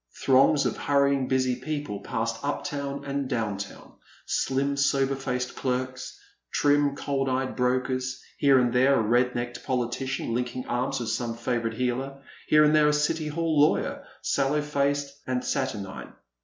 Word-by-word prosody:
Throngs 135 Hz, +2 st, +5 dB
of -, -, -1 dB
hurrying 140 Hz, -2 st, +2 dB
busy 130 Hz, -1 st, +1 dB
people 145 Hz, -5 st, -4 dB
passed 115 Hz, +2 st, -3 dB
up 145 Hz, -, -2 dB
town 140 Hz, -4 st, -4 dB
and 140 Hz, -1 st, -2 dB
down 110 Hz, -5 st, -1 dB
town, 100 Hz, -, -9 dB, 0.3 s
slim 140 Hz, +1 st, 0 dB
sober 140 Hz, -1 st, +2 dB
faced 125 Hz, -2 st, -3 dB
clerks, 130 Hz, 0 st, -3 dB, 0.3 s
trim 145 Hz, -1 st, +3 dB
cold 135 Hz, -1 st, -1 dB
eyed 130 Hz, 0 st, -1 dB
brokers, 130 Hz, 0 st, 0 dB, 0.2 s
here 140 Hz, -2 st, +5 dB
and 120 Hz, -2 st, +2 dB
there 130 Hz, +2 st, +4 dB
a 115 Hz, -, +3 dB
red 120 Hz, +3 st, +2 dB
necked 120 Hz, 0 st, -4 dB
politician 130 Hz, 0 st, -2 dB
linking 125 Hz, +1 st, -2 dB
arms 130 Hz, +2 st, -1 dB
with 115 Hz, -2 st, -3 dB
some 115 Hz, 0 st, -2 dB
favourite 115 Hz, -1 st, -2 dB
heeler, 135 Hz, +2 st, -2 dB, 0.2 s
here 150 Hz, 0 st, +6 dB
and 150 Hz, 0 st, +4 dB
there 150 Hz, -1 st, +5 dB
a 150 Hz, -, +3 dB
City 150 Hz, +1 st, 0 dB
Hall 160 Hz, -1 st, +1 dB
lawyer, 150 Hz, -, +2 dB, 0.2 s
sallow 145 Hz, +2 st, +1 dB
faced 140 Hz, -1 st, -1 dB
and 125 Hz, -1 st, -1 dB
saturnine. 110 Hz, -8 st, -3 dB
130 Hz, 155 wpm, -26 LUFS, 125-140 Hz, 0.3 s, here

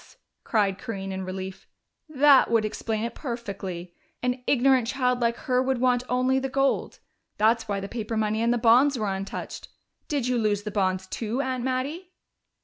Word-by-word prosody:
cried 200 Hz, -4 st, +1 dB
Corinne 195 Hz, -5 st, -5 dB
in 190 Hz, 0 st, -4 dB
relief. 190 Hz, +1 st, -6 dB, 0.4 s
"That 285 Hz, -2 st, +5 dB
would 225 Hz, -2 st, +3 dB
explain 220 Hz, 0 st, -3 dB
it 235 Hz, 0 st, -3 dB
perfectly. 195 Hz, -, -6 dB, 0.3 s
An 250 Hz, 0 st, -1 dB
ignorant 260 Hz, -2 st, +4 dB
child 250 Hz, -1 st, +1 dB
like 235 Hz, -1 st, +1 dB
her 250 Hz, -1 st, +2 dB
would 260 Hz, 0 st, 0 dB
want 250 Hz, -1 st, +3 dB
only 255 Hz, +1 st, +2 dB
the 270 Hz, 0 st, -3 dB
gold 275 Hz, +1 st, 0 dB, 0.4 s
that's 225 Hz, +1 st, +2 dB
why 200 Hz, -1 st, -1 dB
the 195 Hz, -, -5 dB
paper 225 Hz, 0 st, -4 dB
money 215 Hz, 0 st, 0 dB
and 235 Hz, +1 st, +2 dB
the 240 Hz, -, +2 dB
bonds 250 Hz, +4 st, +5 dB
were 210 Hz, -4 st, -1 dB
untouched. 190 Hz, +1 st, -6 dB, 0.4 s
Did 280 Hz, -5 st, -1 dB
you 250 Hz, -1 st, +1 dB
lose 205 Hz, -2 st, 0 dB
the 210 Hz, -, -4 dB
bonds 190 Hz, -2 st, 0 dB
too, 225 Hz, +5 st, -3 dB
Aunt 255 Hz, -2 st, -2 dB
Mattie?" 275 Hz, +8 st, -2 dB
235 Hz, 175 wpm, -26 LUFS, 205-255 Hz, 0.4 s, That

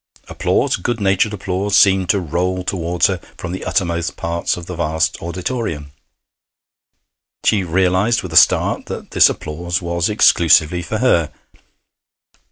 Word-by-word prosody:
Applause -, -, 0 dB
good 115 Hz, +5 st, -3 dB
natured 100 Hz, +1 st, +1 dB
applause 100 Hz, 0 st, -2 dB
seemed 95 Hz, -3 st, +4 dB
to 100 Hz, -, +3 dB
roll 90 Hz, +2 st, -2 dB
towards 90 Hz, -2 st, -1 dB
her 95 Hz, -2 st, 0 dB, 0.2 s
from 90 Hz, -, -6 dB
the 95 Hz, -, -6 dB
uttermost 85 Hz, -2 st, -2 dB
parts 85 Hz, +1 st, -2 dB
of 85 Hz, -, -8 dB
the 90 Hz, -, -7 dB
vast 80 Hz, -1 st, -1 dB
auditorium. 85 Hz, -, -4 dB, 1.5 s
She 100 Hz, -3 st, +2 dB
realized 95 Hz, +5 st, +1 dB
with 90 Hz, -3 st, -7 dB
a -, -, -4 dB
start -, -, +3 dB
that -, -, -8 dB
this -, -, +5 dB
applause 85 Hz, +2 st, -4 dB
was 85 Hz, 0 st, -2 dB
exclusively 85 Hz, -4 st, +3 dB
for 100 Hz, +6 st, -4 dB
her. 85 Hz, -11 st, +2 dB
90 Hz, 140 wpm, -18 LUFS, 85-95 Hz, 1.5 s, this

